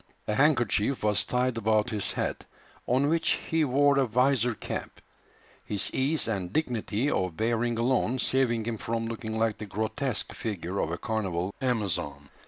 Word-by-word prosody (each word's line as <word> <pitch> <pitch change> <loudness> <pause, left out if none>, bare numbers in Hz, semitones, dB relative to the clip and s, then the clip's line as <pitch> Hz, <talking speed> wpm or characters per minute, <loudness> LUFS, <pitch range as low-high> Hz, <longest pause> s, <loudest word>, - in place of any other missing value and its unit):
A 105 - 0
handkerchief 130 -3 +2
was 105 -1 +2
tied 125 -1 0
about 110 +1 +2
his 105 -3 -2
head, - - -3 0.4
on 130 +4 +3
which 165 +2 +2 0.2
he 160 -1 +3
wore 140 +1 +4
a 135 - +2
visor 125 0 +2
cap, - - -6 0.6
his 105 -2 0
ease 140 +2 +2
and 95 -5 -2
dignity 125 -2 0
of 90 -3 -1
bearing 115 +1 0
alone 125 +1 +1
saving 125 -4 +1
him 115 -2 -3
from 115 0 -2
looking 115 -1 -4
like 110 -1 0
the 105 - -6
grotesque 110 +5 -2
figure 100 -3 -4
of - - 0
a 85 - -3
carnival 95 -4 -2
amazon. 85 - -1
115 Hz, 160 wpm, -28 LUFS, 105-130 Hz, 0.6 s, wore